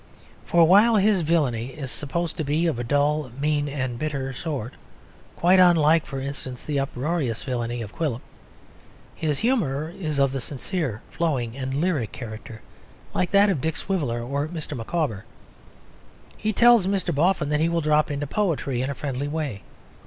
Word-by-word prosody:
For 170 -1 +5
while 210 +6 +6
his 205 -2 +3
villainy 135 -7 0
is 135 -5 -6
supposed 155 +7 -3
to 160 - -1
be 150 +4 +1
of 160 -8 0
a - - -2
dull, 145 +2 +1
mean, 145 0 +1
and 130 -4 -3
bitter 140 -3 -3
sort 135 -4 -4 0.6
(quite 185 +2 +4
unlike, 165 -3 +5
for 135 -2 -4
instance, 130 -2 -6
the 145 -2 -1
uproarious 135 -2 -2
villainy 120 -2 -2
of 105 - -9
Quilp), 145 -8 -2 0.9
his 150 -3 -1
humour 160 - 0
is 155 -6 -3
of 135 -1 +3
the 135 -1 -3
sincere, 140 - -4
flowing 135 -8 -1
and 130 0 -3
lyric 150 - 0
character, 110 -1 -8 0.5
like 180 - 0
that 200 0 +5
of 155 -9 -1
Dick 160 +2 -1
Swiveller 140 -12 -2
or 140 +4 -2
Mr. 155 -3 -5
Micawber. 115 - -2 1.1
He 215 - -1
tells 235 -2 +5
Mr. 190 -3 0
Boffin 160 0 +2
that 150 0 +1
he 160 +2 +2
will 170 0 +1
drop 150 0 +2
into 145 0 -2
poetry 145 - -1
in 130 - -1
a 140 - -3
friendly 140 0 -3
way. 145 -9 -3
150 Hz, 165 wpm, -24 LUFS, 130-170 Hz, 1.1 s, while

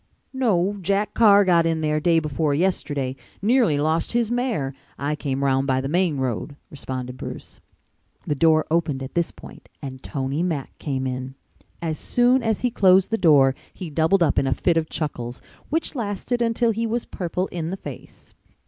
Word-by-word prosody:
"No, 205 -6 +1
Jack 200 +3 0
Carr 205 -3 +6
got 170 -2 +4
in 165 -1 +1
there 155 0 +1
day 165 +2 +3
before 150 -1 0
yesterday. 145 -6 -1 0.2
Nearly 225 - +3
lost 155 +6 0
his 235 -1 +1
mare. 240 - -1 0.2
I 145 +2 -1
came 140 -2 -3
round 135 0 +2
by 130 -1 +2
the 135 - -3
main 170 -1 +1
road," 130 +3 -3 0.2
responded 130 -3 -6
Bruce. - - -8 0.7
The - - 0
door 155 +1 +3
opened 155 -5 0
at 130 - -8
this 170 -1 0
point - - -14
and 130 -2 -8
Tony 135 +2 -3
Mack 160 -6 -2
came 135 -3 -2
in. 130 +1 -4 0.5
As 160 -2 -2
soon 250 +2 +3
as 225 -3 0
he 245 - +1
closed 190 -2 +4
the 225 - +2
door 140 -5 +5 0.2
he 175 -5 -7
doubled 165 +5 +3
up 150 - +2
in 135 - 0
a 130 - +1
fit 175 - +1
of 160 -1 0
chuckles, 125 -6 -4 0.3
which 320 +2 -1
lasted 235 0 -2
until 230 0 +2
he 230 +1 -1
was 235 +1 -2
purple 180 0 -3
in 165 -2 -3
the 190 - -4
face. - - -11
165 Hz, 185 wpm, -23 LUFS, 140-200 Hz, 0.7 s, Carr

